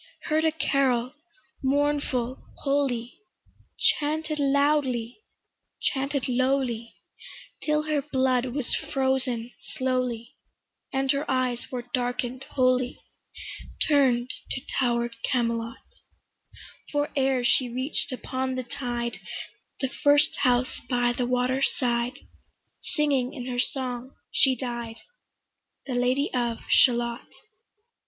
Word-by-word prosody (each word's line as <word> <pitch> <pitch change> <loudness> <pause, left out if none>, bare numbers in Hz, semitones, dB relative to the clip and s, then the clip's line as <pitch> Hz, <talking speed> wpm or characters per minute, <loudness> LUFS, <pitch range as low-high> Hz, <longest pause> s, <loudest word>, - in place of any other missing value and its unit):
Heard 315 0 +1
a 320 - +4
carol, 265 -5 +1 0.5
mournful, 275 -3 0 0.2
holy, 270 -4 0 0.6
Chanted 305 +1 +1
loudly, 280 - +2 0.6
chanted 275 -1 0
lowly, 255 -2 0 0.7
Till 300 0 +1
her 305 -2 +1
blood 260 -3 +1
was 255 0 -2
frozen 260 -3 0 0.2
slowly, 250 -3 -1 0.6
And 270 0 +2
her 280 +1 -1
eyes 255 -2 0
were 250 -2 -3
darken'd 245 +1 -1
wholly, 255 -1 +1 0.9
Turn'd 255 -4 +3 0.2
to 260 - -2 0.2
tower'd 235 -2 +1
Camelot; 230 -1 0 1.1
For 290 0 0
ere 265 -2 +2
she 245 +1 +4
reach'd 260 +3 -2
upon 260 0 -2
the 255 - -2
tide 240 -1 -3 0.6
The 265 - +1
first 290 +2 +3
house 250 -1 +2
by 245 -1 +2
the 245 0 -1
water 250 +1 +1
side, 245 -1 +1 0.8
Singing 280 -5 +1
in 250 -3 -5
her 250 -1 -2
song 255 0 -2 0.2
she 265 -2 +4
died, 240 -3 -5 0.8
The 265 - -3
Lady 250 +4 +1
of 240 -2 0
Shalott. 235 -1 +4
255 Hz, 105 wpm, -27 LUFS, 245-275 Hz, 1.1 s, a